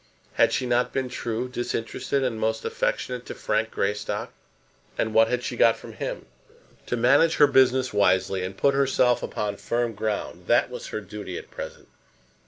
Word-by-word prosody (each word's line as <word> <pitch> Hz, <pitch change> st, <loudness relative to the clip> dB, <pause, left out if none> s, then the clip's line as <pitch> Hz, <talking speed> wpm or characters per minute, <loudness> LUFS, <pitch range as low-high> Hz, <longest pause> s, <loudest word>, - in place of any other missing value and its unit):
Had -, -, +4 dB
she 130 Hz, -, 0 dB
not 120 Hz, 0 st, +1 dB
been 130 Hz, -1 st, -2 dB
true, 120 Hz, 0 st, -3 dB
disinterested, 125 Hz, +2 st, -2 dB
and 120 Hz, -4 st, -1 dB
most 110 Hz, 0 st, -1 dB
affectionate 125 Hz, -1 st, -2 dB
to -, -, -6 dB
Frank -, -, 0 dB
Greystock; 105 Hz, +1 st, -2 dB, 0.6 s
and 110 Hz, -, -1 dB
what 115 Hz, +1 st, +6 dB
had 125 Hz, 0 st, -1 dB
she 125 Hz, -, -3 dB
got 115 Hz, -1 st, +4 dB
from -, -, -11 dB
him? -, -, -5 dB, 0.6 s
To 120 Hz, -, -1 dB
manage 140 Hz, +8 st, +4 dB
her 145 Hz, -, +7 dB
business 130 Hz, -2 st, +3 dB
wisely, 95 Hz, -1 st, +2 dB
and 95 Hz, +1 st, -5 dB
put 140 Hz, +5 st, +3 dB
herself 130 Hz, -3 st, +3 dB
upon 105 Hz, -1 st, -3 dB
firm 120 Hz, -1 st, -1 dB
ground; 105 Hz, 0 st, -4 dB
that -, -, +3 dB
was -, -, -7 dB
her 110 Hz, -, -4 dB
duty 105 Hz, -3 st, -7 dB
at -, -, -10 dB
present. -, -, -8 dB
120 Hz, 175 wpm, -25 LUFS, 110-125 Hz, 0.6 s, her